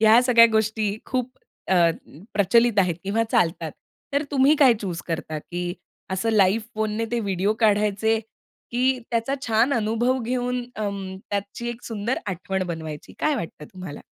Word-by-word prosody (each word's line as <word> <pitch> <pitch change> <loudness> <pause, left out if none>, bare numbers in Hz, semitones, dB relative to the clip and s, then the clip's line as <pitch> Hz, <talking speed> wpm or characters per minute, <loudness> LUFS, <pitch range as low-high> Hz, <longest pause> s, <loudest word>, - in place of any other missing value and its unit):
ह्या 220 +2 +7
सगळ्या 235 -2 +7
गोष्टी 220 -1 +1
खूप 255 -1 -1 0.4
अ, 190 - +5 0.6
प्रचलित 215 +2 +3
आहेत 180 -3 +3
किंवा 210 +4 +1
चालतात. 165 0 +1 0.4
तर 280 - +2
तुम्ही 275 +1 +5
काय 265 -5 +6
चूज 180 -4 -3
करता? 160 -2 -3
की 175 +3 -4 0.4
असं 190 +5 0
लाईव्ह 210 +1 +3
फोनने 215 +1 -1
ते 240 - 0
व्हिडिओ 200 -1 0
काढायचे, 210 +1 +3 0.5
की 255 +2 +2
त्याचा 230 +3 0
छान 225 +4 +3
अनुभव 230 +3 +1
घेऊन 250 +1 -1
अ, 215 -1 -1 0.4
त्याची 205 +4 -3
एक 240 0 -6
सुंदर 225 +2 -2
आठवण 190 +1 -2
बनवायची. 160 -3 -6
काय 305 - +2
वाटतं 165 - -6
तुम्हाला? 185 -6 -8
220 Hz, 150 wpm, -24 LUFS, 190-240 Hz, 0.6 s, ह्या